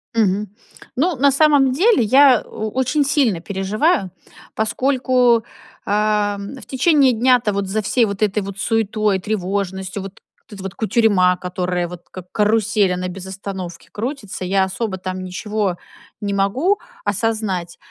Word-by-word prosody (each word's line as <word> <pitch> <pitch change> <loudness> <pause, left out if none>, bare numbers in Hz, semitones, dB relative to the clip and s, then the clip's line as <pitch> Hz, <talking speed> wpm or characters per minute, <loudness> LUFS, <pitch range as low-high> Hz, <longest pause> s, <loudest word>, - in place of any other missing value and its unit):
Мгм. 210 -1 +1 0.5
Ну, 325 +5 +1
на 280 +2 +3
самом 280 -2 +4
деле, 360 - +3
я 260 +2 +6
о 215 0 -6
очень 260 +5 +1
сильно 270 - +1
переживаю, 200 - 0 0.5
поскольку, 250 0 +2 0.4
а, 210 0 +1 0.2
в - - -11
течение 275 -1 +3
дня-то 240 -2 +3
вот 200 -1 -2
за 215 +3 -1
всей 235 +3 +2
вот 200 -1 -5
этой 210 0 +1
вот 200 0 -7
суетой, 215 -3 0
тревожностью, 190 -1 -3
вот 195 0 -10 0.3
вот 215 - -12
эта 195 - -9
вот 195 0 -6
кутерьма, 205 -4 +3
которая 180 -1 -3
вот, 175 0 -10
как 180 -1 -11
карусель, 210 -2 +2
она 180 0 -3
без 185 0 -8
остановки 190 -2 -7
крутится. 215 -5 -5
Я 195 +1 +2
особо 190 +1 -3
там 185 0 -5
ничего 200 +1 -2 0.5
не 200 -1 -2
могу 255 - +1 0.2
осознать, 200 -4 -2
210 Hz, 145 wpm, -20 LUFS, 190-245 Hz, 0.5 s, я